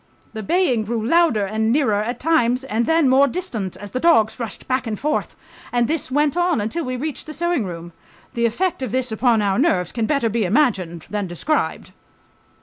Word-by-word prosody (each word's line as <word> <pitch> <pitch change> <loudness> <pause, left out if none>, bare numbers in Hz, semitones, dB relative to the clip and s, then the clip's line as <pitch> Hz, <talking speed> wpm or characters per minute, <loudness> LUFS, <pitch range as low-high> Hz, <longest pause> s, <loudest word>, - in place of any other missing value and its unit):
The 220 - -5
baying 250 - +1
grew 225 0 -2
louder 310 -7 +3
and 220 +3 0
nearer 230 -7 +2
at 235 +3 -4
times 260 -5 +2
and 230 -2 -1
then 325 -3 +3
more 265 +2 +5
distant, 240 - -4
as 205 0 -9
the 255 - -2
dogs 260 -9 +3
rushed 230 -4 -6
back 255 -1 -1
and 215 -2 -3
forth, 300 +1 -2 0.4
and 240 -1 +1
this 315 -4 -1
went 290 +3 +1
on 350 -5 +1
until 225 +11 -2
we 255 -2 -3
reached 295 +3 -5
the 310 - -6
sewing 345 -6 0
room. 170 -1 -7 0.4
The 235 0 +1
effect 340 +8 -1
of 255 - -3
this 255 -1 -1
upon 225 -1 +2
our 195 +1 +1
nerves 185 - +1
can 225 -2 -2
better 280 -6 +1
be 225 0 0
imagined 185 - 0
than 205 -2 -2
described 180 - -2
240 Hz, 200 wpm, -21 LUFS, 215-300 Hz, 0.4 s, more